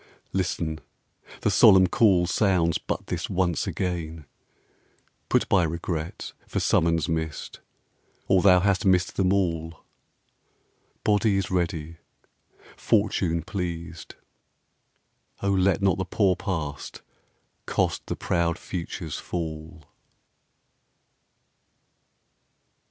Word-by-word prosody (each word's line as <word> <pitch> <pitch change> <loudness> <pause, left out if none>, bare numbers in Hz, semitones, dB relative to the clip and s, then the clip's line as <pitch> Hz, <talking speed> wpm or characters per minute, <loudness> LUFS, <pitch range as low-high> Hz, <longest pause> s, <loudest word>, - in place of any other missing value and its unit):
Listen; 85 -4 -2 0.6
the - - +1
solemn 95 -1 +7
call 90 -2 +3
Sounds 90 -3 +1
but - - -4
this - - -4
once 90 -3 0
again. 80 -4 -3 1.0
Put - - +2
by 100 - +4
regret 85 0 -4
For - - -2
summons 85 -1 +2
missed, 80 -2 -4 0.7
or 95 -2 +4
thou 90 -2 +6
hast 95 -1 +1
missed 90 -2 +2
them 95 -1 +2
all. 85 -5 -1 1.2
Body 105 -1 +2
is 95 - -2
ready, 85 -3 -2 0.8
Fortune 95 -6 +1
pleased; 85 -3 -6 1.3
O 100 - +1
let 95 -1 +2
Not 95 -2 +2
the 95 - -1
poor 95 0 +2
Past 80 -8 -5 0.6
cost - - -1
the - - -2
proud 85 -1 0
Future's 85 -3 -5
fall. 80 -1 -6
90 Hz, 95 wpm, -25 LUFS, 80-95 Hz, 1.3 s, solemn